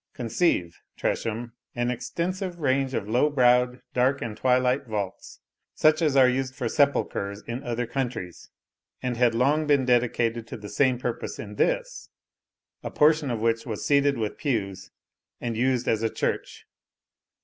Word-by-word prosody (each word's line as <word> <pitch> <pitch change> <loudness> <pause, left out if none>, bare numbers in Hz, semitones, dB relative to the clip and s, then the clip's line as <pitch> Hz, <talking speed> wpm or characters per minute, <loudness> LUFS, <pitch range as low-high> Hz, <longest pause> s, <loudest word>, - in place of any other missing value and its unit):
Conceive, 115 - 0 0.2
Tresham, 115 +1 -2 0.2
an 120 0 0
extensive 175 +9 -3
range 135 -3 0
of 100 - -2
low 125 +7 +2
browed, 125 -2 +3
dark, 130 +3 +2
and 115 -3 -5
twilight 125 +2 +1
vaults, 105 -4 -5 0.3
such 155 +1 +4
as 150 -4 +2
are 130 -2 +7
used 130 +1 -1
for 125 -4 -2
sepulchres 105 -7 0
in 120 +2 -5
other 120 -1 -2
countries, 120 -8 -4 0.5
and 125 -1 -1
had 120 -1 +2
long 145 +6 +2
been 140 -3 +3
dedicated 120 -2 +1
to - - -7
the 105 -1 -9
same 130 0 +2
purpose 120 -1 -4
in 105 -1 -7
this, - - -1 0.7
a - - -5
portion 150 -1 +3
of 115 -3 -2
which 115 +1 0
was 110 -3 -4
seated 140 -1 +3
with 110 -2 -3
pews, 105 -10 -2 0.5
and 120 -2 -3
used 125 +1 +1
as 110 - +1
a 115 - +1
church. - - -3
125 Hz, 155 wpm, -26 LUFS, 115-140 Hz, 0.7 s, are